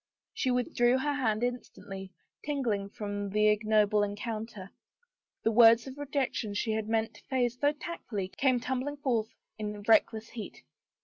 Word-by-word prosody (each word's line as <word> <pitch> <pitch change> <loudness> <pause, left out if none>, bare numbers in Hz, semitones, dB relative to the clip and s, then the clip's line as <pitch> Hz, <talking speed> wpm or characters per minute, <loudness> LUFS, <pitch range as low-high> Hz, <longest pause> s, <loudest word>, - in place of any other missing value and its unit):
She 260 - -1
withdrew 245 -1 +2
her 290 +2 0
hand 230 -5 0
instantly, 195 -6 -5 0.3
tingling 235 -9 -1
from 205 -1 -4
the 210 +2 +3
ignoble 210 -1 +3
encounter. 205 -1 -4 0.7
The 225 - +3
words 230 0 +7
of 265 -1 -8
rejection 265 -7 -2
she 220 +2 0
had 220 0 -2
meant 225 0 0
to - - -17
phrase 245 -2 +1
so 290 0 +4
tactfully 270 - -5
came 255 +3 +2
tumbling 260 +4 -3
forth 235 -6 0 0.3
in 210 -1 -4
reckless 220 +1 +3
heat. 225 -4 -8
225 Hz, 145 wpm, -30 LUFS, 210-255 Hz, 0.7 s, words